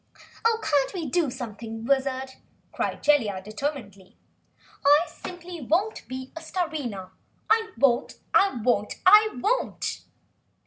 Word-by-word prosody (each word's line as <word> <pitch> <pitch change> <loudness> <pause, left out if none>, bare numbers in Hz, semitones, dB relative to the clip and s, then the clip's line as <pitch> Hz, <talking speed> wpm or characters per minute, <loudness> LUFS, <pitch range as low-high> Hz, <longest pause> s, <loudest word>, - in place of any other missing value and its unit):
"Oh, 455 0 +3
can't 285 +4 +1
we 340 -3 -3
do 310 +2 +1
something 225 -2 -7
Wizard?" 265 0 0 0.4
cried - - -3
Jellia 235 -10 +3
determinedly. 210 -2 -6 0.7
"I 290 +2 +6
simply 350 -2 -9
won't 350 - 0
be 260 +1 -7
Starina! 310 - -4 0.4
I 445 0 +3
won't! 245 -4 +2 0.2
I 390 -11 +4
WON'T!" 375 - +2
275 Hz, 100 wpm, -26 LUFS, 235-350 Hz, 0.7 s, I